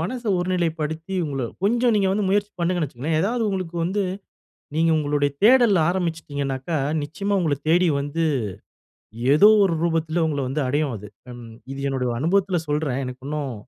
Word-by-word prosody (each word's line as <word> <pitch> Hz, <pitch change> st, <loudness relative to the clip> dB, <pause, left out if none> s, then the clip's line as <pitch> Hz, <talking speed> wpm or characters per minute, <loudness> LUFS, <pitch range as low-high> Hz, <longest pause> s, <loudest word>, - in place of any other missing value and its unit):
மனச 235 Hz, +9 st, -3 dB, 0.2 s
ஒருநிலைப்படுத்தி 165 Hz, -1 st, -2 dB
உங்கள 140 Hz, -3 st, -3 dB, 0.2 s
கொஞ்சம் 235 Hz, +3 st, +2 dB
நீங்க 200 Hz, -2 st, +2 dB
வந்து 205 Hz, 0 st, 0 dB
முயற்சி 205 Hz, +1 st, +1 dB
பண்ணுங்கன்னு 175 Hz, -2 st, 0 dB
வச்சுக்கோங்களன். 145 Hz, +5 st, -2 dB
ஏதாவது, 230 Hz, +6 st, 0 dB
உங்களுக்கு 185 Hz, -4 st, -3 dB
வந்து 195 Hz, +4 st, 0 dB, 0.7 s
நீங்க 165 Hz, +1 st, +3 dB
உங்களுடைய 145 Hz, -1 st, +1 dB
தேடல் 235 Hz, -3 st, +6 dB
ஆரம்பிச்சிட்டிங்கனாக்கா, 160 Hz, -5 st, -2 dB, 0.3 s
நிச்சயமா 200 Hz, +7 st, -2 dB
உங்கள 155 Hz, -4 st, +1 dB
தேடி 175 Hz, +2 st, +4 dB
வந்து. 145 Hz, +4 st, -2 dB, 1.1 s
ஏதோ 175 Hz, +8 st, +7 dB, 0.2 s
ஒரு 190 Hz, -4 st, +2 dB
ரூபத்துல 165 Hz, 0 st, 0 dB
உங்கள 145 Hz, -2 st, -2 dB
வந்து 140 Hz, +4 st, -2 dB
அடையும் 145 Hz, 0 st, 0 dB
அது. 105 Hz, +1 st, -10 dB, 0.2 s
அன் 120 Hz, 0 st, -10 dB, 0.3 s
இது 135 Hz, -, -6 dB
என்னுடைய 130 Hz, -2 st, -1 dB
அனுபவத்துல 180 Hz, +4 st, +1 dB
சொல்றேன். 145 Hz, -3 st, -1 dB
எனக்கு 125 Hz, 0 st, -8 dB
இன்னும். 145 Hz, -3 st, -3 dB
165 Hz, 150 wpm, -23 LUFS, 145-190 Hz, 1.1 s, ஏதோ